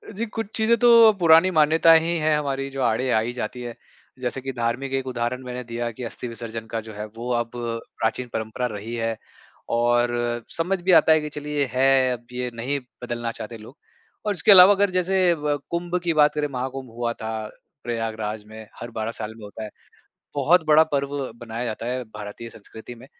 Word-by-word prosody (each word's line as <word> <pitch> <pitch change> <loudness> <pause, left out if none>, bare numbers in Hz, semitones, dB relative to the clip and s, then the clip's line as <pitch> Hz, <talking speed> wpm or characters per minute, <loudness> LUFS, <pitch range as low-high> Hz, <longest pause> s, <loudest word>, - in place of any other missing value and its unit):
जी 225 +4 -2
कुछ 225 -1 -5
चीज़ें 220 +1 +3
तो 230 -2 +7
पुरानी 165 +2 +6
मान्यताएँ 160 0 +5
हीं 170 +1 -1
है 155 0 +2
हमारी 135 -2 -2
जो 135 0 -5
आड़े 125 +2 +1
आ 110 - +4
ही 115 +2 -2
जाती 125 +1 -5
हैं। 120 -1 -6 0.5
जैसे 125 +2 -3
कि 135 +1 -4
धार्मिक 120 +3 -2
एक 135 -1 -1
उदाहरण 125 +1 -2
मैंने 125 0 -6
दिया 120 0 -4
की 120 +3 -9
अस्थि-विसर्जन 115 -1 -6
का 115 0 -3
जो 110 0 -11
है, 105 +1 -5
वो 115 +3 -6
अब 120 -1 -1
प्राचीन 115 0 -3
परंपरा 110 +3 -3
रही 110 +3 -6
है। 115 -1 -2 0.6
और 120 +1 +3 0.5
समझ 180 +3 0
भी 185 +2 +2
आता 160 - +2
है 155 -1 +5
कि 150 - -5
चलिए 150 -1 -2
है 130 0 +3
अब 120 -1 -8
ये 125 0 -3
नहीं 130 +5 -2 0.2
बदलना 120 -1 -3
चाहते 115 0 -8
लोग। 115 +7 -14 0.5
और 210 - +1
इसके 180 +3 +4
अलावा 190 +1 +10
अगर 200 0 +2
जैसे 185 -1 +2
व 150 -2 -1
कुँभ 175 +1 -2
की 170 -1 +1
बात 150 -1 +4
करें 150 0 0
महाकुँभ 130 0 -5
हुआ 120 0 -2
था, 110 -1 -5 0.4
प्रयागराज 110 -2 -3
में। 110 0 -10
हर 120 0 -7
12 110 0 -3
साल 110 -1 -6
में 110 - -13
होता 105 +2 -8
है। 105 - -6 0.7
बहुत 160 +5 +3
बड़ा 155 +1 +7
पर्व 140 0 -1 0.3
मनाया 115 +1 -5
जाता 115 0 -4
है 125 +1 -2
भारतीय 105 +1 -9
संस्कृति 110 +2 -11
में। 120 +2 -14
125 Hz, 200 wpm, -23 LUFS, 115-150 Hz, 0.7 s, अलावा